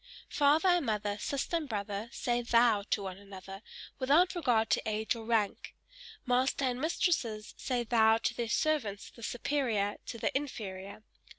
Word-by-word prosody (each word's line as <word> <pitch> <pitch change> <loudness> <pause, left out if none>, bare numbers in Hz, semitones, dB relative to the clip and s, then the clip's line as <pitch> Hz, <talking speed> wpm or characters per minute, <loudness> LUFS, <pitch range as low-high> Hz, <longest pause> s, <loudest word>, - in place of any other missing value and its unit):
Father 300 +5 +4
and 350 -6 +3
mother, 210 -1 -1
sister 280 +8 -1
and 305 -4 -5
brother 205 0 -3
say 240 0 -1
thou 230 -3 +4
to 205 - 0
one 190 0 -6
another 195 -1 -10 0.4
without 295 +8 +4
regard 245 -10 +1
to - - +3
age 215 +1 -1
or 230 - -7
rank. 220 -4 0 0.5
Master 255 +2 +1
and 250 0 -1
mistress 255 - 0
say 250 -2 -2
thou 220 -1 +4
to 230 - -1
their 235 -2 -3
servants 230 -8 0
the 235 - -15
superior 230 -5 -1
to 230 - -5
the 225 - -2
inferior. 205 -8 -5
230 Hz, 160 wpm, -31 LUFS, 210-270 Hz, 0.5 s, Father